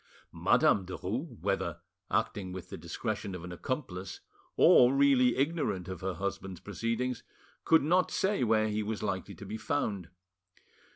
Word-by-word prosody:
Madame 100 - +3
Derues, 110 - -5
whether 85 -3 -1 0.3
acting 100 -2 -1
with 90 -1 -8
the - - -6
discretion 100 +4 -4
of 90 - -8
an 90 - -7
accomplice 95 - -4 0.4
or 125 0 +7
really 135 -3 +4
ignorant 135 - 0
of 95 -2 -6
her 95 -1 -2
husband's 95 -1 -4
proceedings, 115 +4 -2 0.4
could 160 - +5
not 180 +5 +3
say 195 -7 +1
where 110 -2 +3
he 105 0 -1
was 105 0 -3
likely 100 -1 -3
to 100 - -10
be 105 +3 -5
found. 105 - -2
105 Hz, 150 wpm, -31 LUFS, 95-125 Hz, 0.4 s, or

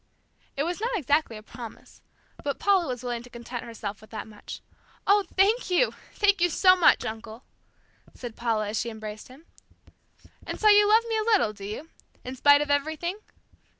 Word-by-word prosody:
It 280 - +1
was 350 +5 -3
not 470 0 0
exactly 290 - +1
a 215 - -12
promise, 230 0 -11 0.4
but 285 -1 -2
Paula 385 -4 +2
was 250 -1 -4
willing 240 -1 -3
to 245 - -14
content 235 0 -7
herself 215 -3 -7
with 215 - -16
that 220 - -6
much. 210 -1 -10 0.4
"Oh, 405 0 +4
thank 410 +4 +3
you, 365 +7 +2 0.2
thank 405 -3 +3
you 350 - +4
so 370 +3 +5
much, 360 - +4
uncle," 220 +2 -7 0.7
said 240 -3 -8
Paula 220 -3 -1
as 215 - -1
she 235 - -3
embraced 215 -1 -8
him. 270 +6 -16 1.0
"And - - -6
so 430 - +5
you 415 0 +6
love 445 +2 +5
me 450 -1 0
a 435 +1 -1
little, 215 - -1
do 200 -1 -10
you? 220 +11 -7 0.4
In 255 +1 -5
spite 285 +2 +6
of 295 -1 -1
everything?" 315 +6 -1
280 Hz, 185 wpm, -26 LUFS, 225-375 Hz, 1.0 s, you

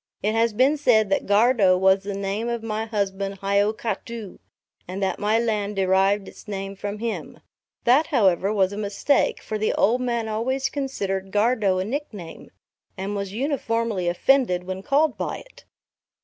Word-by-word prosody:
It 210 +2 +1
has 230 +1 +2
been 260 +7 +3
said 220 -7 +3
that 195 - 0
Gardow 205 -2 +4
was 190 +1 +4
the 200 0 -5
name 200 +4 -2
of 235 -1 -3
my 220 0 -2
husband 200 -2 -3
Hiokatoo, 210 +1 -2 0.5
and 190 +2 -4
that 190 - -1
my 210 +2 +2
land 210 -3 -1
derived 195 +1 +2
its - - -13
name 195 -1 -5
from 205 +1 -5
him; 230 +1 -5 0.4
that 270 +6 +4
however 195 - +2
was 195 -2 +1
a - - -6
mistake, 210 +7 0
for 215 - -4
the 215 - +1
old 240 +5 +2
man 235 -2 -1
always 255 +5 -1
considered 195 -9 -3
Gardow 210 -2 +2
a 185 - -1
nickname, 210 - -6 0.5
and 195 +2 -3
was 200 -1 -4
uniformly 230 - -1
offended 180 0 +2
when 185 +1 -5
called 290 +4 +1
by - - -2
it. - - -16
210 Hz, 165 wpm, -24 LUFS, 195-235 Hz, 0.5 s, Gardow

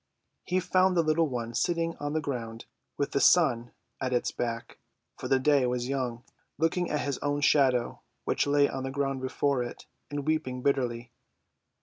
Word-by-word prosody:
He 185 +1 +1
found 185 0 +2
the 170 - +4
little 155 +1 +2
one 120 -2 -4
sitting 165 +3 0
on 145 0 -3
the 155 - 0
ground, 115 -5 -5 0.3
with 140 - -1
the - - +1
sun 130 -9 +4 0.3
at 130 - -1
its 125 - 0
back 115 -1 -4 0.4
(for - - -6
the 135 - +4
day 135 -1 +3
was 125 0 -1
young), 125 -3 -2 0.3
looking 165 +3 0
at 150 -1 -1
its 140 - -2
own 145 0 -1
shadow, 130 -5 +3 0.2
which - - 0
lay 145 0 +4
on 135 - -4
the 135 - -3
ground 135 -1 -2
before 130 0 0
it, 120 - -6 0.2
and 145 -1 -4
weeping 130 -5 -1
bitterly. 120 -4 0
140 Hz, 180 wpm, -28 LUFS, 125-150 Hz, 0.4 s, the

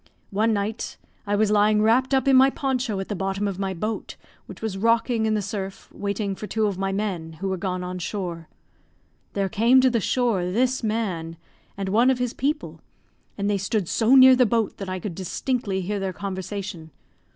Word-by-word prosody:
One 215 +3 +2
night, 210 +2 -2 0.3
I 205 - +1
was 210 0 +2
lying 210 0 +4
wrapped 250 +5 +3
up 265 +1 +1
in 270 - +6
my 265 +1 +7
poncho 260 -6 -2
at 195 - -4
the 205 - -3
bottom 195 +2 -1
of 195 -1 -4
my 190 -1 -2
boat, 215 +5 -4 0.3
which - - -10
was 220 -3 -3
rocking 230 +2 +2
in 215 - +1
the 210 - -1
surf, 195 -1 -6
waiting 200 0 -3
for 210 +2 -7
two 220 0 0
of 200 -2 0
my 195 0 0
men, 190 -5 -3
who 190 +5 -4
were 190 - 0
gone 180 0 -3
on 180 0 -5
shore. 175 -3 -5 0.8
There 200 -1 0
came 230 +6 +4
to 260 0 +4
the 235 - +1
shore, 225 -4 +1
this 255 +6 +1
man 190 -8 -2 0.4
and 195 -1 -3
one 230 +6 +4
of 260 - +2
his 250 -1 -2
people, 295 +3 -2 0.6
and 200 0 -1
they 205 -1 +1
stood 200 -1 -1
so 230 +7 +3
near 260 -1 +9
the 250 -1 +4
boat, 225 -1 0
that 195 -2 -6
I 185 - -2
could 190 0 -5
distinctly 195 +3 -2
hear 200 +3 -2
their 190 -1 -2
conversation. 190 -3 -5
205 Hz, 205 wpm, -24 LUFS, 190-230 Hz, 0.8 s, near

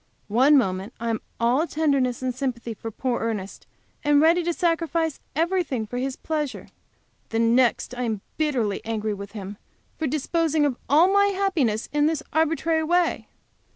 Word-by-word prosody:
One 265 +7 +5
moment 190 -2 -1
I 230 0 -1
am 225 - -2 0.2
all 250 +8 +2
tenderness 275 -6 0
and 255 -1 -1
sympathy 240 -3 -3
for 225 +1 -7
poor 245 +2 -2
Ernest, 210 -4 -4 0.4
and 295 -1 +4
ready 330 +3 +5
to 345 - +1
sacrifice 330 -2 0 0.2
everything 330 -8 0
for 245 +4 -5
his 265 0 -2
pleasure. 300 -4 -4 0.6
The 225 - -2
next 235 +2 +2
I 250 - -4
am 220 -5 -2
bitterly 250 -10 0
angry 220 -1 -2
with 200 0 -8
him 200 -1 -7 0.4
for 315 - 0
disposing 310 +2 +1
of 275 -4 0
all 330 +7 +5
my 400 0 +5
happiness 360 - 0
in 295 0 +3
this 310 -2 -1
arbitrary 320 0 +1
way. 345 +2 +1
275 Hz, 160 wpm, -24 LUFS, 230-320 Hz, 0.6 s, One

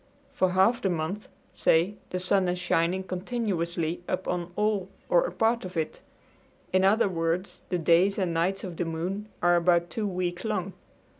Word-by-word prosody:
For 185 -1 +1
half 225 +6 +4
the 195 - +1
month, 175 +5 -3 0.3
say, 170 +5 +3 0.2
the 185 - -2
sun 185 +1 +1
is 180 0 0
shining 180 +1 +1
continuously 180 -4 -2
upon 180 -1 -2
all 210 -3 0 0.2
or - - +4
a - - -5
part 230 +1 +1
of 185 -1 -7
it. 160 -1 -2 0.7
In 185 0 +4
other 205 +3 +4
words, 170 +1 -2
the 180 - 0
days 175 +4 +3
and 185 -4 0
nights 180 +4 0
of 175 -4 -6
the 175 - -1
moon 180 +6 -3
are 175 0 +5
about 175 0 +3
two 215 -2 -2
weeks 180 -2 -2
long. 195 -4 -2
185 Hz, 170 wpm, -27 LUFS, 170-200 Hz, 0.7 s, are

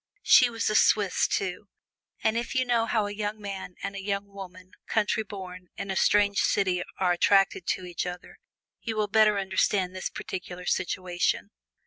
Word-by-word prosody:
She 250 - +6
was 230 -2 -2
a 215 - +1
Swiss, 205 -2 +3
too, 195 +1 -3 0.6
and 220 - +2
if 235 +3 -3
you 255 0 +2
know 235 -2 +1
how 215 -2 +1
a 205 - -4
young 210 +1 -4
man 195 -3 -7
and 200 - -4
a 195 - -5
young 200 0 -2
woman, 185 -2 -11 0.2
countryborn, 195 -4 -2
in 195 - -4
a - - -2
strange 200 0 +3
city 185 -3 +1 0.2
are 185 -2 +2
attracted 195 0 +3
to 185 - -1
each 175 0 -4
other, 180 0 -8 0.4
you 225 -2 -4
will 215 -1 0
better 210 0 +4
understand 190 -1 0
this 185 - -3
particular 180 -1 -7
situation. 180 -1 -1
195 Hz, 170 wpm, -27 LUFS, 185-210 Hz, 0.6 s, She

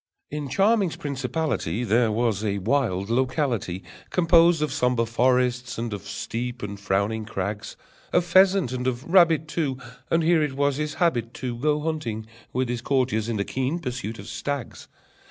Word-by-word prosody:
In 150 -2 -4
Charming's 200 - +2
principality 140 - -2
There 115 0 +3
was 110 -2 0
a 100 -2 0
wild 105 -2 0
locality, 125 - 0 0.3
Composed 170 0 +4
of 150 - -1
sombre 125 -2 +1
forest, 125 +1 +1
and 115 -1 -3
of 100 -4 -7
steep 120 +1 -4
and 100 -1 -5
frowning 100 +2 0
crags, 100 -1 -4 0.3
Of 175 - +3
pheasant 190 -4 +4
and 125 0 -2
of 125 0 -1
rabbit, 165 -3 +4
too; 150 -5 -1 0.3
And 165 0 +2
here 165 0 +4
it 150 -3 0
was 140 0 +1
his 150 0 -3
habit 120 -9 0
to 125 -2 -4
Go 150 +4 +1
hunting 135 -9 -3 0.3
with 130 0 0
his 120 -1 -3
courtiers 125 -4 0
in 115 - -1
the 100 - -1
keen 135 +5 -1
pursuit 125 -7 -5
of - - -9
stags. 140 -4 -5
125 Hz, 165 wpm, -25 LUFS, 115-150 Hz, 0.3 s, Composed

